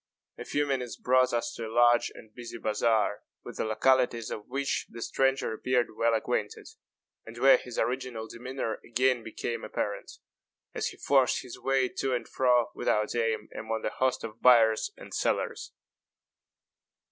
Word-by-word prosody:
A - - -6
few 145 0 0
minutes 130 -4 -2
brought 130 0 +3
us 120 -1 -1
to 115 - -5
a - - -8
large 120 +1 +4
and 110 -1 -14
busy 120 -1 -8
bazaar, 110 -1 +1 0.2
with - - -9
the - - -1
localities 115 +1 +2
of 105 - -6
which 135 +2 -2
the 115 - -10
stranger 135 +1 0
appeared 125 0 0
well 115 0 +2
acquainted, 110 - -2 0.6
and 115 +1 -11
where 135 +3 +7
his 125 -2 -9
original 125 -3 -2
demeanor 125 -1 -5
again 125 +1 +1
became 115 +1 -5
apparent, - - -3 0.6
as - - -2
he - - -7
forced 135 -3 +2
his 125 - -10
way 135 -1 +1
to 130 +1 -2
and 120 - -4
fro, 125 -2 +2
without 105 0 0
aim, 115 -2 -1
among 110 0 -4
the - - -1
host 130 -1 0
of 115 0 -8
buyers 115 -3 +5
and - - -11
sellers. - - -1
120 Hz, 160 wpm, -28 LUFS, 115-130 Hz, 0.6 s, where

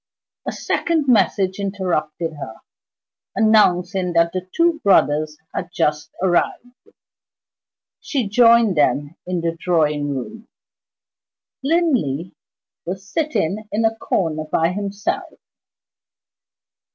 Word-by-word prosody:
A - - 0
second 320 -4 -1
message 195 -4 +2
interrupted 180 -5 -2
her, 140 -7 -8 0.8
announcing 185 -4 +3
that 170 0 +3
the 185 0 -4
two 335 -1 +2
brothers 155 -5 +3 0.2
had 180 - -4
just 150 -2 -1
arrived. 190 +7 -1 1.1
She 265 -8 -2
joined 230 -2 +5
them 145 +1 +1
in 180 -1 -1
the 165 0 -1
drawing 150 -5 +1
room. 220 - -7 1.2
Linley 255 - 0 0.5
was 190 +3 -6
sitting 215 - -2
in 225 +2 +1
a 225 0 +1
corner 160 -8 -1
by 165 +1 +2
himself. 200 +1 -4
185 Hz, 100 wpm, -20 LUFS, 165-220 Hz, 1.2 s, joined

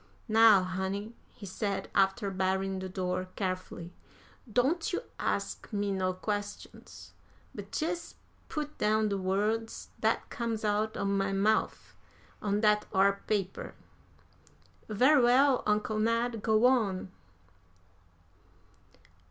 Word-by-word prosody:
"Now, 220 -3 +6
honey," 190 +4 -3 0.2
he 205 - -12
said, 200 +1 -3
after 195 +1 +2
barring 190 0 -1
the 190 0 -5
door 185 0 -3
carefully, 185 -2 -4 0.6
"don't 275 - +1
you 370 - -2 0.2
ax - - -1
me 205 -1 -1
no 190 -1 0
questions, 205 +2 -6 0.4
but - - -6
jes' 335 +2 -3 0.3
put 300 -1 -5
down 215 0 +2
de 200 - -1
words 210 +4 -1
dat - - 0
comes 230 -3 -3
out 215 +1 0
o' - - -2
my 195 0 0
mouf 210 +3 0 0.5
on 205 0 0
dat 210 -1 +3
ar 200 0 +3
paper." 195 -3 -2 1.1
"Very 255 +7 +5
well, 255 +2 +4
Uncle 215 +1 +1
Ned, 230 +1 0
go 220 +1 +3
on." 210 -8 +2
210 Hz, 115 wpm, -30 LUFS, 195-225 Hz, 1.1 s, Now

